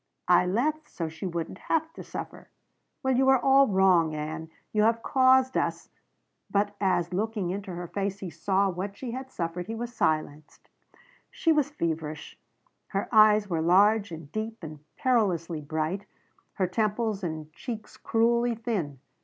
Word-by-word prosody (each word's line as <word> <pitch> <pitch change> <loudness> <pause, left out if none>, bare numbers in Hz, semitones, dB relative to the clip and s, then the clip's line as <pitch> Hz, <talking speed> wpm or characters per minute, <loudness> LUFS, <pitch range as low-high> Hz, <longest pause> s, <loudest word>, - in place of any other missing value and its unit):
"I 180 0 +5
left 300 +10 0
so 165 -2 -4
she 160 +4 -6
wouldn't 170 +1 -4
have 320 0 -1
to - - -9
suffer." - - -8 0.5
"Well 265 -1 +2
you 265 +1 +3
were 265 0 +6
all 270 +2 +5
wrong, 185 -5 +3
Ann. 160 +1 -5 0.2
You 210 - +3
have 230 +1 +2
caused 260 0 +4
us - - -1 0.3
" - - -50
But 205 0 0
as, 180 -2 +1
looking 205 -2 -1
into 195 0 -5
her 175 0 -5
face, 195 +2 -3
he 190 -4 -7
saw 190 +5 +1
what 195 +2 -4
she 250 -3 -5
had 260 +2 -6
suffered, 175 -3 -4
he 225 - -4
was 240 +1 -5
silenced. 155 -6 -2 0.6
She 330 - +1
was 300 -3 +2
feverish; 160 - -4 0.5
her 195 0 -3
eyes 215 -1 +6
were 165 -4 -1
large 200 +4 +4
and 160 -3 -9
deep 220 -1 -5
and 155 -1 -8 0.2
perilously 180 -10 +1
bright, 160 +7 -3 0.5
her 190 - 0
temples 215 +2 -1
and 155 -2 -5
cheeks 225 +2 -7
cruelly 235 +1 +1
thin. 205 - -3
200 Hz, 160 wpm, -27 LUFS, 170-230 Hz, 0.6 s, were